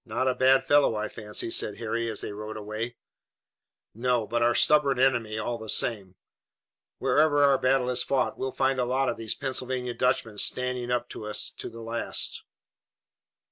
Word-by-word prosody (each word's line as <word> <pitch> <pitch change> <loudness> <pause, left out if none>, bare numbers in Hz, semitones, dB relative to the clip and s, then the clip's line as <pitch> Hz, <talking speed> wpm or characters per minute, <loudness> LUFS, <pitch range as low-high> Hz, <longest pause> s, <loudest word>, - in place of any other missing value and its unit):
"Not 120 +2 -2
a 130 - +3
bad 130 +1 +4
fellow, 145 -4 +4
I 105 0 -2
fancy," 105 +2 -3
said 105 - -2
Harry, 115 0 -2
as 110 - -4
they - - -5
rode 105 +1 -7
away. 110 +3 -5 1.0
"No, 120 0 0
but 120 +2 -1
our 120 0 +3
stubborn 145 -2 +4
enemy, 120 -4 +1
all 115 +2 -3
the 110 -1 -8
same. 100 -6 0 0.8
Wherever 145 -1 +3
our 140 -2 +4
battle 130 -1 +2
is 125 0 +2
fought 130 +1 0
we'll 130 - -3
find 135 0 +1
a 125 - +1
lot 130 +2 +1
of - - -3
these 115 -1 -3
Pennsylvania 130 -2 -2
Dutchmen 120 -4 0
standing 125 +1 -1
up 125 0 0
to 105 - -7
us 105 - 0
to - - -7
the 115 - -10
last." 115 +1 -2
120 Hz, 180 wpm, -27 LUFS, 110-130 Hz, 1.0 s, bad